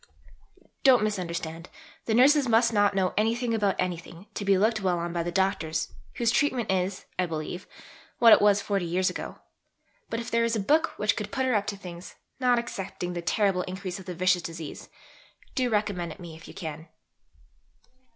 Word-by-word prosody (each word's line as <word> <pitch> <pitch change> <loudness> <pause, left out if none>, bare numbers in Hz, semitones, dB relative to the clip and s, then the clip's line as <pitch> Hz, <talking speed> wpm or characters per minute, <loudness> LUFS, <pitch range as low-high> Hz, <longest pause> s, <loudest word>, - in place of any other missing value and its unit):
Don't 255 -5 +6
misunderstand: 170 -5 -3 0.4
the 220 - +1
Nurses 270 +2 +5
must 230 +1 +4
not 205 -1 +3
know 185 -2 +1
anything 230 +2 +1
about 205 -3 +1
anything, 175 0 -4
to - - -4
be 195 -1 +4
looked 215 +2 +2
well 185 -2 +1
on 170 0 -3
by 170 - 0
the 175 +1 -3
Doctors, 165 -4 0 0.2
whose 235 -1 +2
treatment 250 -6 +1
is, 185 0 -1
I 180 - +2
believe, 160 +2 -5 0.5
what 230 -2 +8
it - - +6
was 205 -1 +4
40 200 -2 0
years 180 +2 +1
ago. - - -6 0.7
But 225 - -2
if 235 - -6
there 230 0 +3
is 230 0 +1
a - - 0
book 300 +11 +2
which 210 -1 +2
could 210 -1 -5
put 260 -1 0
her 255 - +1
up 205 -2 +1
to 200 - -3
things, 175 -1 -9 0.2
not 250 -2 +3
excepting 195 -6 -4
the 175 - -3
terrible 190 +1 +1
increase 185 0 -5
of 190 - -12
the 180 - -5
vicious 185 +1 +2
disease, 165 -2 -7 0.6
do 255 -1 +1
recommend 205 -6 -1
it - - -19
me 170 -3 -9
if 160 - -13
you - - -12
can. 160 -2 -6
195 Hz, 190 wpm, -27 LUFS, 175-225 Hz, 0.7 s, what